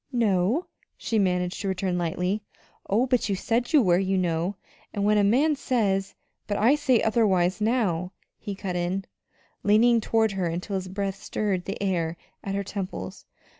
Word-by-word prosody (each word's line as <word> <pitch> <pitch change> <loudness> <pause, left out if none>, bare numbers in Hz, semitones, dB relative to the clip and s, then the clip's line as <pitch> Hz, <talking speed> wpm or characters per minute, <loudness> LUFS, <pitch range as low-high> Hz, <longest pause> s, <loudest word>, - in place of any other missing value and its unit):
"No?" 225 - +1 0.3
she 225 - -1
managed 180 -1 0
to 200 - -3
return 190 -1 -1
lightly. 180 +4 -1 0.5
"Oh, 220 +6 +3
but 250 -4 +1
you 200 - +1
said 235 +7 -1
you 300 -5 +6
were, 175 -2 +4
you 190 0 0
know; 175 +1 0 0.4
and 200 -1 0
when 210 0 +4
a - - +3
man 275 +10 +3
says 205 -8 0 0.2
" - - -51
"But 205 - -1
I 235 +6 +5
say 270 -5 +2
otherwise 200 -4 +2
now," 200 -7 0 0.3
he 205 -2 -5
cut 190 -2 -4
in, 180 +2 -1 0.6
leaning 230 +3 +4
toward 220 -1 +2
her 190 -3 -1
until 175 +5 -4
his 190 -1 -3
breath 195 +1 -3
stirred 190 -4 -2
the 195 - -4
hair 170 -4 -1 0.3
at 195 0 -3
her 200 - -1
temples. 195 -1 -6
200 Hz, 175 wpm, -26 LUFS, 185-220 Hz, 0.6 s, you